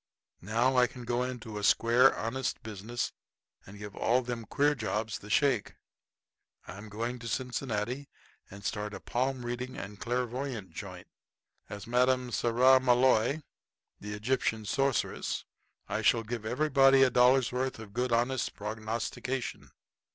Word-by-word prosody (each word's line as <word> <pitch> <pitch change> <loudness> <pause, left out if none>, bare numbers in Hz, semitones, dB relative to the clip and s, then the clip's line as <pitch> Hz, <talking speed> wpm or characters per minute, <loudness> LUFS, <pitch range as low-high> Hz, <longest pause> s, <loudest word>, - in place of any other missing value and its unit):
"Now 115 +7 +1
I 125 0 +6
can 125 +1 -10
go 120 +1 0
into 120 -4 -4
a - - -7
square, 115 +4 +5
honest 125 +3 -3
business, 110 +3 -4 0.6
and 100 +2 -11
give 105 -1 -8
all 125 +2 +2
them 120 -2 -4
queer 145 +5 +2
jobs 110 -4 -3
the 105 - -12
shake. 125 -1 +2 0.9
I'm 100 +5 -9
going 115 +4 -3
to 115 - -7
Cincinnati 125 +1 -3 0.4
and 100 0 -11
start 105 -1 -3
a - - -7
palm 130 0 -2
reading 125 +1 -4
and 100 0 -7
clairvoyant 125 -3 -3
joint. - - -8 0.6
As 100 0 -7
Madame 125 +1 +2
Saramaloi, 130 +3 +4 0.6
the 105 +1 -6
Egyptian 110 -1 -1
Sorceress, 135 +2 -1 0.4
I - - -2
shall 115 - +3
give 110 -1 -5
everybody 135 +1 +5
a 130 - +4
dollar's 125 +1 +4
worth 130 +1 -2
of 110 -3 -11
good 125 +2 -1
honest 120 +2 0
prognostication. 110 +4 -4
120 Hz, 135 wpm, -30 LUFS, 110-130 Hz, 0.9 s, I